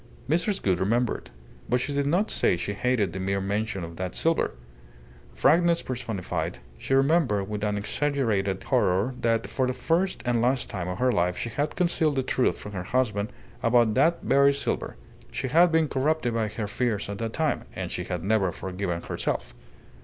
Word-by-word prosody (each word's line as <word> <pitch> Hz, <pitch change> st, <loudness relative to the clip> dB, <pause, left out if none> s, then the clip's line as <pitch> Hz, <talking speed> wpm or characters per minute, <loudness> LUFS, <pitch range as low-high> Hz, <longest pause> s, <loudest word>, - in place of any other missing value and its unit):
Mrs. 175 Hz, +7 st, +1 dB
Gould 95 Hz, -3 st, +2 dB
remembered. 115 Hz, -, 0 dB, 0.4 s
But 125 Hz, -, +3 dB
she 140 Hz, +3 st, -2 dB
did 140 Hz, 0 st, 0 dB
not 180 Hz, +8 st, +1 dB
say 90 Hz, -, +2 dB
she 100 Hz, -, -3 dB
hated 105 Hz, -4 st, 0 dB
the 95 Hz, -, -4 dB
mere 95 Hz, +1 st, 0 dB
mention 100 Hz, 0 st, -2 dB
of 85 Hz, 0 st, -8 dB
that 90 Hz, -1 st, -4 dB
silver. 165 Hz, 0 st, +1 dB, 0.8 s
Frankness 170 Hz, +1 st, +4 dB
personified, 115 Hz, -7 st, -3 dB, 0.2 s
she 135 Hz, -, 0 dB
remembered 135 Hz, -, +2 dB
with 105 Hz, 0 st, -4 dB
an 105 Hz, -1 st, 0 dB
exaggerated 105 Hz, -5 st, 0 dB
horror 105 Hz, -1 st, +2 dB
that 115 Hz, -1 st, +1 dB
for 130 Hz, -1 st, -1 dB
the 130 Hz, -, 0 dB
first 175 Hz, +7 st, 0 dB
and 120 Hz, -1 st, +2 dB
last 125 Hz, +1 st, +1 dB
time 90 Hz, -5 st, -3 dB
of 90 Hz, 0 st, -3 dB
her 125 Hz, +3 st, +2 dB
life 90 Hz, -4 st, +1 dB
she 115 Hz, -, -3 dB
had 145 Hz, +5 st, -2 dB
concealed 165 Hz, -4 st, +1 dB
the 135 Hz, -, +1 dB
truth 130 Hz, 0 st, +1 dB
from 105 Hz, -, -8 dB
her 95 Hz, -3 st, -4 dB
husband 110 Hz, 0 st, 0 dB, 0.3 s
about 115 Hz, -2 st, +4 dB
that 160 Hz, +7 st, +2 dB
very 140 Hz, 0 st, +4 dB
silver. 140 Hz, -, -2 dB, 0.4 s
She 130 Hz, -, -3 dB
had 170 Hz, +5 st, +5 dB
been 160 Hz, -1 st, +3 dB
corrupted 140 Hz, -2 st, 0 dB
by 115 Hz, -1 st, 0 dB
her 105 Hz, 0 st, -4 dB
fears 110 Hz, -1 st, -1 dB
at 100 Hz, 0 st, -5 dB
that 115 Hz, -1 st, -3 dB
time, 160 Hz, -2 st, 0 dB
and -, -, -4 dB
she 90 Hz, -, -3 dB
had 90 Hz, -3 st, -4 dB
never 100 Hz, -2 st, +2 dB
forgiven 90 Hz, -1 st, -4 dB
herself. -, -, -3 dB
115 Hz, 185 wpm, -26 LUFS, 100-140 Hz, 0.8 s, had